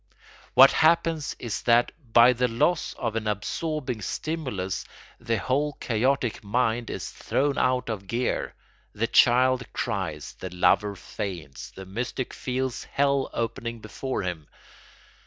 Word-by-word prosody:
What 135 Hz, +1 st, +9 dB
happens 160 Hz, -1 st, +2 dB
is 115 Hz, -, -4 dB
that 120 Hz, +1 st, +4 dB, 0.2 s
by 120 Hz, +2 st, +7 dB
the 125 Hz, +1 st, +1 dB
loss 125 Hz, +9 st, +1 dB
of 115 Hz, -3 st, -3 dB
an 110 Hz, -1 st, -2 dB
absorbing 125 Hz, +4 st, -2 dB
stimulus 125 Hz, -, -3 dB, 0.4 s
the 115 Hz, -1 st, -1 dB
whole 140 Hz, +7 st, 0 dB
chaotic 125 Hz, 0 st, 0 dB
mind 115 Hz, +2 st, 0 dB
is -, -, -5 dB
thrown 140 Hz, 0 st, 0 dB
out 130 Hz, 0 st, +1 dB
of 100 Hz, -4 st, -4 dB
gear; 120 Hz, +5 st, -1 dB, 0.4 s
the 110 Hz, -, 0 dB
child 125 Hz, +1 st, +4 dB
cries, -, -, -3 dB
the 95 Hz, -, -5 dB
lover 100 Hz, +3 st, +2 dB
faints, 85 Hz, -8 st, -6 dB
the 95 Hz, -, -10 dB
mystic 120 Hz, +6 st, -4 dB
feels 130 Hz, -1 st, -3 dB
hell 140 Hz, -1 st, +1 dB
opening 115 Hz, 0 st, -3 dB
before 110 Hz, +4 st, -4 dB
him. 85 Hz, -5 st, -4 dB
120 Hz, 130 wpm, -26 LUFS, 105-130 Hz, 0.4 s, What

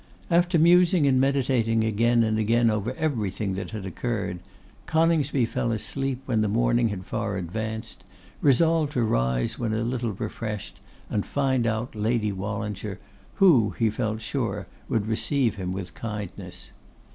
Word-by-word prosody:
After 175 Hz, +1 st, +3 dB
musing 175 Hz, 0 st, +5 dB
and 130 Hz, -2 st, +4 dB
meditating 125 Hz, -5 st, +2 dB
again 115 Hz, +2 st, +3 dB
and 110 Hz, -1 st, +1 dB
again 115 Hz, +1 st, +3 dB
over 105 Hz, +4 st, -2 dB
everything 110 Hz, -, -1 dB
that 95 Hz, -, -4 dB
had 110 Hz, -3 st, -6 dB
occurred, 100 Hz, -1 st, -3 dB, 0.5 s
Coningsby 160 Hz, -5 st, +2 dB
fell 115 Hz, +1 st, -1 dB
asleep 135 Hz, +4 st, -2 dB
when 115 Hz, -5 st, +1 dB
the 110 Hz, -, +2 dB
morning 120 Hz, +2 st, +2 dB
had 95 Hz, -3 st, -5 dB
far 105 Hz, -3 st, -2 dB
advanced, 110 Hz, +5 st, -5 dB, 0.4 s
resolved 155 Hz, +2 st, +3 dB
to 120 Hz, -, +1 dB
rise 60 Hz, -, 0 dB
when 110 Hz, -2 st, -1 dB
a 110 Hz, +1 st, 0 dB
little 120 Hz, -2 st, -2 dB
refreshed 105 Hz, +1 st, -5 dB, 0.3 s
and 105 Hz, -, 0 dB
find 130 Hz, -4 st, 0 dB
out 110 Hz, +2 st, -2 dB
Lady 110 Hz, 0 st, 0 dB
Wallinger, 100 Hz, 0 st, -4 dB, 0.4 s
who, 140 Hz, -, +5 dB
he 115 Hz, -2 st, +2 dB
felt 110 Hz, -1 st, -2 dB
sure, 110 Hz, -4 st, -2 dB, 0.2 s
would 115 Hz, -5 st, 0 dB
receive 115 Hz, +2 st, 0 dB
him 90 Hz, -1 st, -3 dB
with 90 Hz, -2 st, -5 dB
kindness. 105 Hz, -4 st, -7 dB
115 Hz, 145 wpm, -26 LUFS, 105-130 Hz, 0.5 s, musing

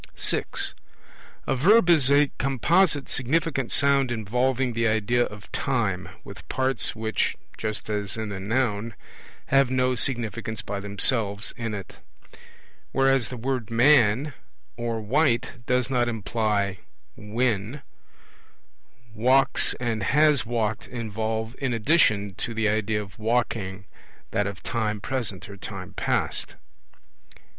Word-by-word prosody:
(6) -, -, +1 dB, 0.7 s
A -, -, 0 dB
Verb 190 Hz, -, +5 dB
is 155 Hz, -7 st, +4 dB
a 145 Hz, 0 st, +4 dB
composite 145 Hz, -, +2 dB
significant 135 Hz, 0 st, -1 dB
sound 140 Hz, -2 st, +3 dB
involving 125 Hz, +3 st, 0 dB
the 115 Hz, 0 st, +1 dB
idea 110 Hz, +3 st, +2 dB
of 105 Hz, -1 st, -11 dB
time, 110 Hz, -9 st, -1 dB
with -, -, -12 dB
parts 130 Hz, 0 st, +1 dB
which 110 Hz, 0 st, -1 dB, 0.2 s
(just 110 Hz, -1 st, -4 dB
as 105 Hz, -1 st, -3 dB
in 110 Hz, -1 st, -4 dB
the 100 Hz, -2 st, -5 dB
Noun) 110 Hz, +1 st, -1 dB, 0.5 s
have 135 Hz, -1 st, +4 dB
no 130 Hz, 0 st, +1 dB
significance 115 Hz, -3 st, -1 dB
by 100 Hz, 0 st, -4 dB
themselves 100 Hz, +1 st, +1 dB
in 115 Hz, -3 st, -4 dB
it. 95 Hz, -3 st, -9 dB, 0.9 s
Whereas 135 Hz, -3 st, +2 dB
the 125 Hz, -, -6 dB
word 125 Hz, -2 st, -3 dB
'man' 125 Hz, +2 st, +4 dB, 0.4 s
or 115 Hz, -1 st, -3 dB
'white' 120 Hz, 0 st, 0 dB
does 125 Hz, 0 st, +1 dB
not 125 Hz, -3 st, +1 dB
imply 105 Hz, -3 st, -1 dB, 0.4 s
when, 115 Hz, +3 st, -2 dB, 1.3 s
'walks' 130 Hz, +5 st, +3 dB
and 115 Hz, -3 st, -2 dB
'has 150 Hz, +3 st, +3 dB
walked' 110 Hz, -2 st, -2 dB
involve 110 Hz, 0 st, -4 dB
in 135 Hz, -3 st, -1 dB
addition 105 Hz, -, +2 dB
to 115 Hz, -2 st, -4 dB
the 110 Hz, -1 st, +1 dB
idea 105 Hz, 0 st, 0 dB
of 95 Hz, 0 st, -15 dB
walking 110 Hz, -4 st, -1 dB, 0.5 s
that 105 Hz, -, 0 dB
of 100 Hz, -1 st, -7 dB
time 110 Hz, -3 st, -2 dB
present 110 Hz, -4 st, -3 dB
or 100 Hz, 0 st, -10 dB
time -, -, -7 dB
past. -, -, -1 dB
115 Hz, 125 wpm, -25 LUFS, 105-130 Hz, 1.3 s, Verb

